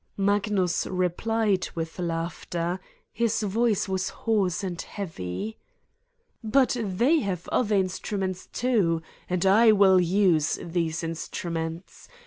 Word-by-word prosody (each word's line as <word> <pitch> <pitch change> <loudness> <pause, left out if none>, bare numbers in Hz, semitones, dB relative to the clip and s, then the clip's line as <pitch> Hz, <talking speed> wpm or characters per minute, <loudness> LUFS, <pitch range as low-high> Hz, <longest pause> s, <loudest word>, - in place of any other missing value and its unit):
Magnus 200 -3 +1
replied 190 +2 0
with 165 +1 -5
laughter: 170 +1 -3 0.3
his 225 -1 0
voice 210 +1 +1
was 190 0 -1
hoarse 200 -6 0
and 175 -3 -3
heavy: 180 - -5 0.8
"But 250 +4 +3
they 235 - +2
have 190 - -3
other 215 -4 +1
instruments, 190 0 -2
too! 195 -10 +1 0.3
And 180 0 0
I 220 +4 +6
will 195 -3 +6
use 175 -4 +2
these 165 -1 -2
instruments. 165 +1 -5
190 Hz, 110 wpm, -26 LUFS, 170-210 Hz, 0.8 s, I